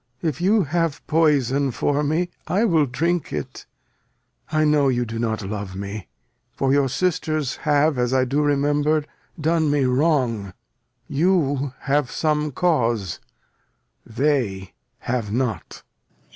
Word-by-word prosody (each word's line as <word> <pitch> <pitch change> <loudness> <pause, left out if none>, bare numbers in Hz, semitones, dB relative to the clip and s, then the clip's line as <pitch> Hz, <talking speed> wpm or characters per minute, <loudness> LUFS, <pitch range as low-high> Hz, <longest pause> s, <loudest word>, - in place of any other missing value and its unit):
If 155 -2 -2
you 200 +3 +3
have 165 0 -1
poison 145 -4 +2
for 145 +4 0
me, 165 +4 0 0.2
I 205 +5 +2
will 160 -8 +3
drink 165 +6 -1
it. 75 -2 -6 0.8
I 155 0 +2
know 150 -2 +3
you 120 -2 +1
do 115 0 -5
not 110 -2 -1
love 100 -1 -5
me; 100 0 -6 0.5
for 135 0 +2
your 140 -1 +3
sisters 155 -3 -1
Have, 145 -1 +3
as 125 0 +1
I 130 -1 +3
do 140 +4 0
remember, 145 +1 +1 0.3
done 160 0 +1
me 145 -2 +2
wrong. 125 - +1 0.5
You 145 -4 +1
have 140 -1 +1
some 150 -1 0
cause, 120 - 0 0.8
they 115 -7 -1 0.3
have 120 -4 -2
not. 115 -4 -3
140 Hz, 130 wpm, -22 LUFS, 120-155 Hz, 0.8 s, you